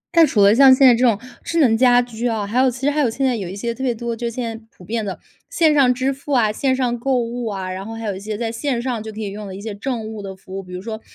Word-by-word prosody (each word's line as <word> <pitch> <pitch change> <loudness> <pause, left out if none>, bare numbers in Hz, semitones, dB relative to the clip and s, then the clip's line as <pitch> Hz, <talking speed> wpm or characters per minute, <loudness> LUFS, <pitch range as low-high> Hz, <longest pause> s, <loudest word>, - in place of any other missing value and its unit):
那 335 - +8
除 205 -7 +3
了 200 +1 +6
像 265 +2 +7
现 270 - +5
在 250 - +8
这 235 +2 0
种 230 -5 +3 0.2
智 335 0 -1
能 245 -8 +4
家 245 +1 +5
居 240 -1 -2
啊， 220 -3 -1
还 220 +5 -1
有 260 0 +4
其 250 +1 -8
实 285 +2 +2
还 300 - -1
有 270 -5 +3
现 270 +4 -2
在 255 -2 +2
有 195 -6 -5
一 190 - -7
些 235 +3 -3
特 255 - -10
别 245 -3 0
多， 235 +1 -4
就 235 +1 -3
现 230 -1 -5
在 - - -23
普 180 - -17
遍 225 +4 -2
的， 195 -3 -5 0.3
线 320 -3 +3
上 275 -4 +4
支 260 +2 0
付 280 +2 -9
啊、 225 -5 +3
线 260 +4 0
上 245 -2 -1
购 265 +2 +1
物 240 0 -3
啊， 190 -3 -4
然 185 +1 -5
后 225 +3 -7
还 225 0 -6
有 205 -2 -2
一 - - -7
些 210 +1 -5
在 225 0 -2
线 245 +2 -2
上 240 -2 -3
就 220 0 -7
可 215 - -9
以 210 -2 -3
用 210 +1 -7
的 190 - -7
一 - - -8
些 215 0 -5
政 225 +2 -4
务 220 -1 -7
的 195 -1 -7
服 190 0 -11
务， 195 - -4
比 180 -1 -14
如 180 +1 -6
说 220 0 -6
230 Hz, 360 characters per minute, -20 LUFS, 210-255 Hz, 0.3 s, 那